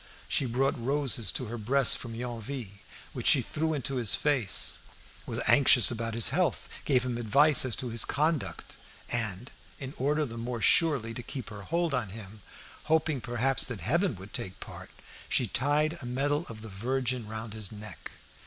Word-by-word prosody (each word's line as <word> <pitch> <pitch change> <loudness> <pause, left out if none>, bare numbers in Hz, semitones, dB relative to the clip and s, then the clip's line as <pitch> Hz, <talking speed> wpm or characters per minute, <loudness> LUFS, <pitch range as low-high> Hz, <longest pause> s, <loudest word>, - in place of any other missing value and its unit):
She 135 - +2
brought 125 0 0
roses 135 -4 +1
to 130 - -1
her 120 +1 -6
breast 130 +5 +3
from 115 -2 -7
Yonville, 120 -3 -6 0.3
which - - -3
she - - +6
threw 160 0 -2
into 135 -1 -1
his 120 -4 +1
face; 130 -10 +1 0.5
was - - -2
anxious 130 -3 +6
about 115 -1 -3
his 115 - +4
health, 170 +6 0 0.2
gave 130 -3 +2
him 120 -2 -2
advice 140 +6 +5
as 125 - +2
to 125 - -4
his 115 -1 +2
conduct; 155 0 -2 0.3
and, 115 -1 -2 0.3
in 135 0 -6
order 150 +3 +1
the 115 -3 -7
more 120 0 -4
surely 135 -4 +3
to 125 - -5
keep 125 -1 -7
her 100 -1 -8
hold 170 - -1
on 120 -6 -1
him, 105 0 -10 0.5
hoping 155 -3 +1
perhaps 120 +3 +1
that 120 -6 -5
heaven 170 - +1
would 95 +2 -12
take 95 - -2
her - - -23
part, - - -10 0.4
she - - +2
tied 150 +5 0
a 120 - -6
medal 145 +6 -1
of 110 -1 -9
the 110 - -8
Virgin 125 +3 -2
round 110 0 -6
his 110 -3 -3
neck. 105 0 -9
125 Hz, 180 wpm, -29 LUFS, 115-140 Hz, 0.5 s, she